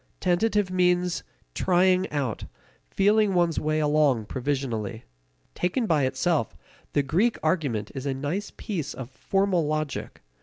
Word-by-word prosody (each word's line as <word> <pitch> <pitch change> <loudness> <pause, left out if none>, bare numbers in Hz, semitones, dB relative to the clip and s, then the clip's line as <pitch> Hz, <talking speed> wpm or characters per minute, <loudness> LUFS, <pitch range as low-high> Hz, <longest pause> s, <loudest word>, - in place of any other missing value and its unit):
Tentative 195 +2 +1
means 180 -1 +2 0.3
trying 185 +1 +3
out, 140 -7 -2 0.4
feeling 205 0 +3
one's 170 -2 +2
way 155 0 0
along 145 -6 +2
provisionally. 120 -4 -3 0.5
Taken 180 +7 0
by 150 -9 +2
itself, 130 - 0 0.4
the 145 - +2
Greek 190 - +1
argument 125 - 0
is 135 0 -5
a 135 - 0
nice 150 +10 -3
piece 165 - -4
of 130 -1 -7
formal 195 -3 +1
logic. 155 - -3
155 Hz, 125 wpm, -26 LUFS, 135-185 Hz, 0.5 s, trying